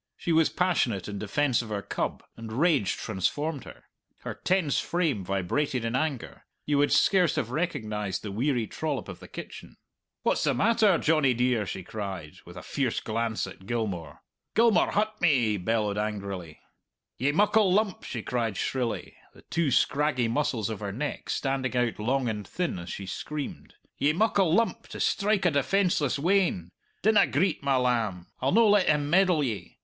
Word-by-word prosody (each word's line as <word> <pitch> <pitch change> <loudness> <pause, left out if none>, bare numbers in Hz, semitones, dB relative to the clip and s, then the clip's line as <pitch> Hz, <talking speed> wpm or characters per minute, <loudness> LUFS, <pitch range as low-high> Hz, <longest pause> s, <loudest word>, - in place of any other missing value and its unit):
She 170 - -2
was 160 -1 +4
passionate 130 - 0
in 100 -1 -5
defence 125 +4 +1
of 115 - -9
her 100 -2 -3
cub, - - -3
and 115 -1 -8
rage 140 - +2
transformed 140 - -2
her. - - -12 0.4
Her - - -5
tense 180 -6 +1
frame 160 - -1
vibrated 115 +8 -1
in 115 +1 -1
anger; 140 -2 -3 0.2
you 145 -1 +1
would 145 - +3
scarce 180 -5 +4
have 115 - -2
recognized 105 - -2
the 105 - -5
weary 120 +2 0
trollop 150 +3 -3
of 95 -3 -8
the - - -12
kitchen. - - -10 0.5
"What's - - +1
the - - +2
matter, 220 -4 +4
Johnny 150 -5 +2
dear?" 120 -4 +1
she 95 - -5
cried, 95 -6 -6
with 85 +1 -12
a - - -8
fierce 130 -5 -1
glance 115 0 -2
at 95 - -12
Gilmour. 100 -10 -3 0.3
"Gilmour 230 -1 +4
hut 215 +1 0
me!" 155 -7 +4
he 105 - 0
bellowed 105 +1 0
angrily. 100 -6 -4 0.6
"Ye 135 +4 +2
muckle 205 +3 +3
lump!" 205 0 +1
she 115 -4 -5
cried 115 -5 -2
shrilly, 125 -3 -2 0.2
the - - -17
two 165 -3 +1
scraggy 135 -2 +2
muscles 115 -4 -1
of 110 - -5
her 100 -2 -4
neck 145 +8 -4
standing 135 -2 -1
out 120 -3 0
long 130 +4 0
and 105 -3 -3
thin 175 - -2
as 85 - -8
she 100 - -5
screamed; 145 +9 -6 0.2
"ye 145 +2 +3
muckle 200 -2 +2
lump 230 +4 +1
to - - -8
strike 200 -1 +1
a 175 - +4
defenceless 150 -1 +1
wean! 165 - +1 0.3
Dinna 215 +1 +5
greet, 175 +5 0
my 140 -1 +1
lamb; 115 -8 0 0.2
I'll 130 - +1
no 225 +2 +5
let 205 -2 +4
him 150 -1 +2
meddle 180 -4 +4
ye. 115 -6 -4
130 Hz, 175 wpm, -27 LUFS, 105-165 Hz, 0.6 s, Dinna